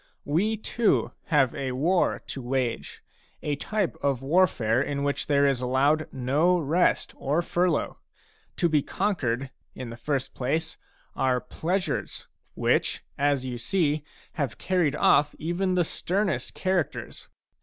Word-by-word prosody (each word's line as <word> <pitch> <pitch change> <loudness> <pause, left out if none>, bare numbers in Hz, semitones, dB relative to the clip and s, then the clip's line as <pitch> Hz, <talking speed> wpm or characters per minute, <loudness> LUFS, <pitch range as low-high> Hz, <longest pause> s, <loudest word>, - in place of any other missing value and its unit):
We 200 +10 +1
too 220 +1 +1
have 135 -6 +3
a 135 -3 -3
war 170 +8 +1
to 135 - -6
wage, 125 -1 -2 0.4
a 145 - 0
type 195 +3 -1
of 135 -2 0
warfare 135 -7 +3
in 140 0 -2
which 140 0 -1
there 140 -1 +4
is 135 -3 +2
allowed 140 +5 +2
no 145 +8 +2
rest 165 +2 +1
or 150 +5 0
furlough. 175 -2 0 0.6
To 170 - +2
be 155 -3 +3
conquered, 135 - -1 0.2
in 125 -2 -6
the 115 - -8
first 135 +2 -2
place, 160 +5 -2 0.4
are 130 -1 +2
pleasures, 175 - -3 0.3
which, - - +1
as 140 -2 +1
you 125 -2 -4
see, 155 +1 0 0.3
have 140 -7 -2
carried 175 -6 +1
ofF 145 0 +4
even 180 +4 -1
the 175 -2 +3
sternest 185 - -1
char 185 -2 +2
acters. - - -10
145 Hz, 140 wpm, -26 LUFS, 130-175 Hz, 0.6 s, there